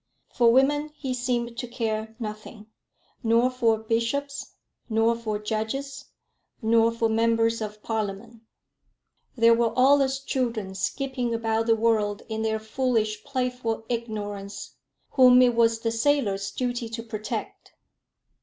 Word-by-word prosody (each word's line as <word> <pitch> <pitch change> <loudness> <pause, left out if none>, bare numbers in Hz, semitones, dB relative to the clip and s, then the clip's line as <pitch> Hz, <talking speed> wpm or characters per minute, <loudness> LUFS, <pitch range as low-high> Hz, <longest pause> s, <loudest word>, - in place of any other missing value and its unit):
For 235 -1 +5
women 290 +4 +3
he 270 -4 -4
seemed 240 -1 -2
to 245 - -4
care 225 -2 -3
nothing, 215 -1 -7 0.6
nor 235 +2 +3
for 230 -3 +2
bishops, 235 +6 -2 0.3
nor 225 +1 +2
for 220 -2 -3
judges, 230 +6 -4 0.5
nor 230 0 +3
for 230 0 0
members 230 0 +2
of 210 0 -6
Parliament. 220 +1 -4 1.0
They 230 0 +6
were 230 -1 +3
all 275 +3 +6
as 270 0 0
children 235 -8 -2
skipping 250 +3 -2
about 225 0 0
the 225 - +5
world 215 -2 +1
in 220 0 -3
their 220 0 0
foolish 220 -2 -1
playful 250 -4 -2
ignorance, 205 - -5 0.4
whom 250 -1 +7
it 245 -1 +4
was 230 -1 +2
the 230 - 0
sailor's 225 -5 +1
duty 245 -2 -3
to 230 0 -5
protect. 215 -2 -6
230 Hz, 130 wpm, -25 LUFS, 220-250 Hz, 1.0 s, whom